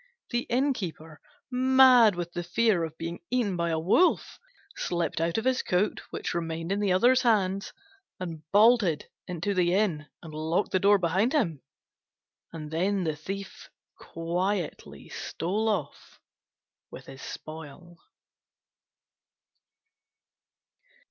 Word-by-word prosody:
The 240 0 -1
Innkeeper, 185 - -2 0.3
mad 255 -4 +6
with 175 0 -5
the 175 - -3
fear 185 +1 +1
of 160 0 -6
being 170 +1 -5
eaten 240 -7 0
by 170 -1 -1
a 160 - 0
wolf, 195 - +2 0.4
slipped 170 - -2
out 165 +3 0
of 225 - -2
his 260 0 +2
coat, 185 +4 0
which - - -4
remained 165 0 -3
in 200 - 0
the 205 -2 +1
other's 245 +7 +4
hands, 200 -5 +1 0.5
and 165 -4 -6
bolted 205 -7 +4 0.2
into 180 +3 -2
the 180 -1 +2
inn 170 -7 0 0.2
and 160 -2 -10
locked 160 +5 -1
the 185 - +2
door 200 +2 +5
behind 190 - +1
him; 170 - 0 0.9
and 155 -2 -8
the 180 -1 0
Thief 195 +6 -7 0.3
then - - -15
quietly 175 +1 -3
stole 205 +7 -2
off 180 -10 -4 0.7
with - - -11
his 135 0 -11
spoil. 160 +2 -10
180 Hz, 125 wpm, -27 LUFS, 165-215 Hz, 0.9 s, mad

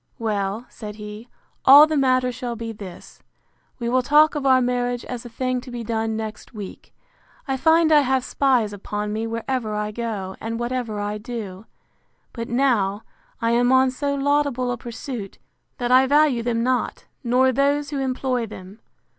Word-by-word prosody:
Well, 210 0 -2
said 210 -2 -9
he, 210 +2 -9 0.3
all 285 +3 +10
the 310 0 -2
matter 255 -2 +2
shall 245 -1 -5
be 230 0 -5
this: 195 -5 -11 0.6
We 235 - -4
will 255 +2 +2
talk 300 +4 +5
of 285 -2 -1
our 260 -1 +6
marriage 245 -1 -1
as 245 -1 -6
a - - -11
thing 255 +1 -2
to 255 - -11
be 240 -1 -5
done 225 0 -2
next 220 +2 -7
week. 205 -3 -9 0.6
I 270 - 0
find 320 +3 +4
I 300 - +7
have 265 -1 +1
spies 250 -7 +1
upon 210 +1 -4
me 220 +1 -2
wherever 230 -1 -3
I 210 0 -2
go, 210 -4 -4
and 230 +1 -4
whatever 240 -3 -3
I 205 +1 -3
do: 215 -4 -7 0.7
But 230 -1 -5
now, 230 -6 +1 0.4
I 230 - +2
am 245 +1 +3
on 260 0 +4
so 280 +2 -2
laudable 280 -3 +1
a 245 - -3
pursuit, 235 -3 -7 0.4
that 245 0 -2
I 260 +1 +6
value 290 -3 +3
them 230 -1 -1
not, 255 0 -1 0.2
nor 255 +2 +3
those 285 +2 +1
who 285 - -2
employ 255 -2 -1
them. 195 +1 -11
245 Hz, 175 wpm, -23 LUFS, 220-260 Hz, 0.7 s, all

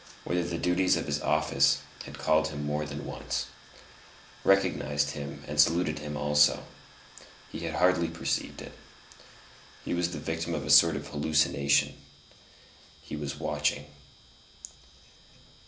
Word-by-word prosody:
whither 90 0 -1
the 85 -1 -3
duties 90 +2 +2
of - - -3
his 75 +1 -2
office 75 -3 +2 0.2
had - - -10
called 80 0 +2
him 75 -2 -5
more 75 +1 -2
than 75 -1 -7
once, - - -4 1.0
recognized 75 -7 +2
him 70 -1 -7
and 75 +1 -4
saluted 80 0 +1
him 75 0 -5
also: 75 0 +3 0.9
he - - -6
had 80 -2 -4
hardly 90 0 +3
perceived 85 0 -3
it; - - -10 1.1
he - - -2
was 85 0 0
the 85 - -6
victim 80 +2 -3
of 75 -3 -4
a 75 - 0
sort 80 +1 +7
of 70 0 -5
hallucination; 75 -1 +2 1.1
he - - -7
was 70 -1 -5
watching. 75 -1 -1
75 Hz, 135 wpm, -28 LUFS, 75-80 Hz, 1.1 s, sort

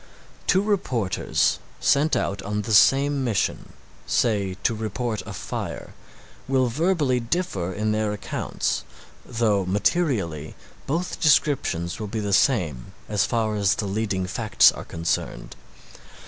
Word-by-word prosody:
Two 190 +1 +4
reporters 135 - 0 0.2
sent 145 +3 +3
out 100 +1 -1
on 105 +1 -3
the 110 +1 -2
same 140 +5 +5
mission, 115 -6 -1 0.3
say 100 -5 +1
to - - +2
report 110 0 -3
a - - -6
fire, - - -6 0.5
will 130 -2 +2
verbally 150 -2 +1
differ 115 - -2
in 105 +3 -1
their 110 -1 0
accounts 105 - -2 0.4
though 110 -5 +1
materially 95 - 0 0.3
both 170 +6 -2
descriptions 130 - +2
will 105 - -4
be 110 +2 -3
the 100 -1 -2
same 90 - +1
as 105 -2 +1
far 110 -2 0
as 100 -1 +2
the 105 - -3
leading 100 -2 -1
facts 105 +4 +4
are - - -9
concerned. 85 0 -3
110 Hz, 130 wpm, -24 LUFS, 100-135 Hz, 0.5 s, same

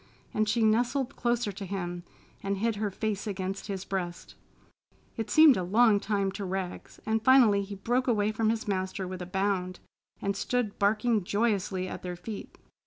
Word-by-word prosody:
and 215 0 +1
she 230 +1 +2
nestled 245 +4 +1
closer 240 -3 0
to 200 +1 -8
him 175 -2 -4 0.4
and 195 0 -2
hid 225 +1 0
her 210 0 -1
face 210 +1 -3
against 195 0 -4
his 195 -2 -4
breast. 175 -3 -4 0.8
It 225 -3 -4
seemed 310 -4 +7
a - - 0
long 210 +3 +4
time 200 -2 0
to 200 +1 -6
Rags, 190 -1 -5
and 220 0 0
finally 240 -6 +6
he 200 0 -6
broke 245 +6 0
away 215 -3 +2
from 220 0 +1
his 225 +1 -1
master 190 -1 -2
with 185 0 -6
a 180 - -5
bound 190 -1 -1 0.4
and 200 0 -1
stood 235 0 -1
barking 215 +1 +2
joyously 200 -2 0
at - - -6
their 180 -1 -5
feet. 205 +4 -8
205 Hz, 175 wpm, -29 LUFS, 190-225 Hz, 0.8 s, seemed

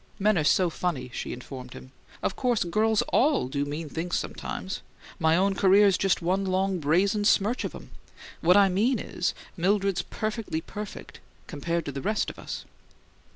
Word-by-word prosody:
"Men 210 +1 +3
are 160 - +2
so 175 +3 +3
funny!" 155 -8 -3
she - - -4
informed 125 0 -8
him. 130 - -11 0.3
"Of - - 0
course 245 -4 +1
girls 215 +5 +2
ALL 280 - +3
do 140 +2 -2
mean 150 +3 -4
things 165 +4 -2
sometimes. 190 - -5 0.4
My 160 -1 +3
own 195 +2 +2
career's 195 0 +5
just 190 -2 +1
one 185 +3 +1
long 190 0 0
brazen 185 +8 +2
smirch 210 +3 +2
of - - -4
'em! - - -11 0.5
What 180 +4 +5
I 200 -1 +7
mean 215 +8 +2
is, 180 -2 -2 0.2
Mildred's 195 +1 +1
perfectly 215 -6 -3
perfect 205 +5 -8 0.3
compared 170 +2 -3
to 145 - -3
the 135 0 -5
rest 215 +6 0
of - - -16
us." - - -6
185 Hz, 170 wpm, -27 LUFS, 165-205 Hz, 0.5 s, I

